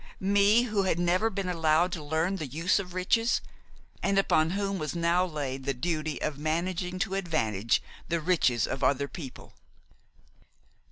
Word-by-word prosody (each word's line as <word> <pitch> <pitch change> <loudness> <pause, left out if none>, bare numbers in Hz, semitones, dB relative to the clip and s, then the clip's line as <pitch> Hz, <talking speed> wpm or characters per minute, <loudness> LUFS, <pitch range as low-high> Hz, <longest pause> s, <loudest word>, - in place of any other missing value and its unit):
me, 200 +4 +4
who 215 -4 0
had 185 -3 +1
never 175 +5 +2
been 195 -2 -3
allowed 165 0 +2
to 160 -3 -5
learn 160 +6 0
the 155 - -4
use 165 +9 +1
of 180 -2 -7
riches, 225 +6 +2 0.6
and 200 0 +1
upon 160 -5 +3
whom 195 +1 -2
was 155 +2 -3
now 170 +1 +2
laid 140 -6 -4
the 140 0 -1
duty 155 +2 -2
of 150 -2 -2
managing 175 +4 -2
to 190 +1 -1
advantage 115 - 0 0.3
the 170 - +1
riches 155 -8 +2
of 135 +1 -4
other 140 +2 +2
people! 140 -5 -10
170 Hz, 160 wpm, -28 LUFS, 150-190 Hz, 0.6 s, me